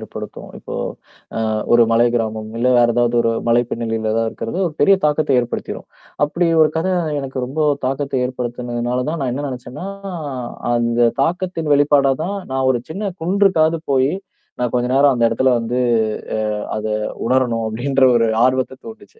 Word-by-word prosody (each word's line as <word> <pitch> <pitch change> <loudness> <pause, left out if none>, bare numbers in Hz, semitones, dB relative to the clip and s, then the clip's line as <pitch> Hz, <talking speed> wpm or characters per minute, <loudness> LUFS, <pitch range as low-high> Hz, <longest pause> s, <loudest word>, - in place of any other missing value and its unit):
ஏற்படுத்தும். - - -8
இப்போ - - -8 0.8
அ - - 0 0.2
ஒரு 120 - +7
மலை 115 +1 +4
கிராமம், 110 -1 -2
இல்ல 120 - +1
வேற 120 - +5
ஏதாவது 120 0 +2
ஒரு 115 0 +1 0.2
மலை 120 +1 +4
பின்னணியில 115 -1 -2
ஏதாவது 115 0 +1
இருக்கிறது, 115 +8 -5
ஒரு 160 - -8
பெரிய 195 +7 +6
தாக்கத்த 150 -3 +2
ஏற்படுத்திரும். 120 0 -5 0.4
அப்படி 170 +4 -1 0.2
ஒரு 155 - +5
கதை 185 +3 0 0.3
எனக்கு 135 -1 -6
ரொம்போ 145 +5 -2 0.2
தாக்கத்தை 135 0 -1
ஏற்படுத்துனதுனால 120 -1 -3
தான், 165 0 -3
நான் 130 -2 -1
என்ன 145 +3 -3
நெனைச்சேன்னா 130 +6 -7 0.9
அந்த 120 0 +2
தாக்கத்தின் 170 -1 -2
வெளிப்பாடாதான், 145 +5 +2
"நான் 130 0 0
ஒரு 120 - -1
சின்னக் 190 +1 -5
குன்றுக்காவது 170 -3 +3
போயி, 135 +1 +2 0.5
நான் 125 -1 0
கொஞ்ச 125 0 +1
நேரம் 140 0 +5
அந்த 120 -2 0
இடத்துல 130 +3 +2
வந்து 120 +2 -2 0.8
அ - - -4
அத 110 - -4 0.4
உணரனும்." 120 -3 +1
அப்படின்ற 130 +5 0
ஒரு 115 -1 +2 0.2
ஆர்வத்த 130 0 0
தூண்டுச்சு. 225 - -13
130 Hz, 155 wpm, -19 LUFS, 120-150 Hz, 0.9 s, ஒரு